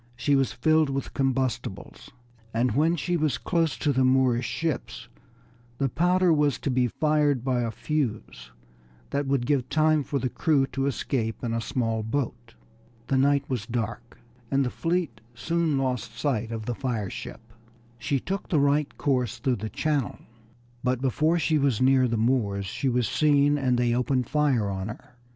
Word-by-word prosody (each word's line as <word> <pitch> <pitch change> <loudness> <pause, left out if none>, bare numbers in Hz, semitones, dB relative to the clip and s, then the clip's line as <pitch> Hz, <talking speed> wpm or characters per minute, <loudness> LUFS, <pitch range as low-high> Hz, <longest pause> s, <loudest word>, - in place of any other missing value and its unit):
She 135 +4 +1
was 135 -1 +2
filled 155 -2 +2
with 135 -1 -3
combustibles, 130 -7 -2 0.5
and 120 +1 +2
when 155 +8 +2
she 175 +2 -1
was 155 -3 0
close 165 -4 0
to 145 - +1
the 130 0 +2
Moorish 130 -2 +3
ships 125 -7 -3 0.7
the 135 -1 0
powder 180 +5 +3
was 150 -3 +2
to 140 - -1
be 125 -1 +2
fired 150 -1 +1
by 130 -2 0
a 115 - -1
fuse 115 - -3 0.6
that 140 0 -1
would 135 -3 +1
give 135 -2 0
time 155 -1 +3
for 140 - -2
the 130 - -1
crew 145 0 +2
to 135 0 -2
escape 115 -5 -2
in 115 -2 -1
a 115 - -1
small 115 -2 -1
boat. 115 - -4 0.5
The 135 - +2
night 140 +1 +2
was 120 -5 -3
dark, 120 0 -4 0.3
and 135 -1 +2
the 125 - -2
fleet 165 -10 -2
soon 165 +3 0
lost 125 -4 -2
sight 120 -6 -1
of 110 -1 -5
this 120 0 -3
fire 120 -6 -2
ship. 115 0 -9 0.5
She 135 +3 0
took 195 +8 -4
the 155 - +2
right 145 +1 +1
course 125 -5 0
through 125 +1 0
the 110 +2 -5
channel, 150 -1 -1 0.7
but 125 0 +1
before 155 +6 +1
she 160 -2 +1
was 135 -6 +1
near 130 0 +4
the 115 -1 -1
Moors 110 -4 +1
she 130 +8 -2
was 125 -2 +1
seen 145 +3 +3
and 130 -4 +1
they 120 -1 +2
opened 125 0 0
fire 140 -8 +1
on 95 0 -3
her. 115 +2 -10
130 Hz, 175 wpm, -26 LUFS, 120-145 Hz, 0.7 s, near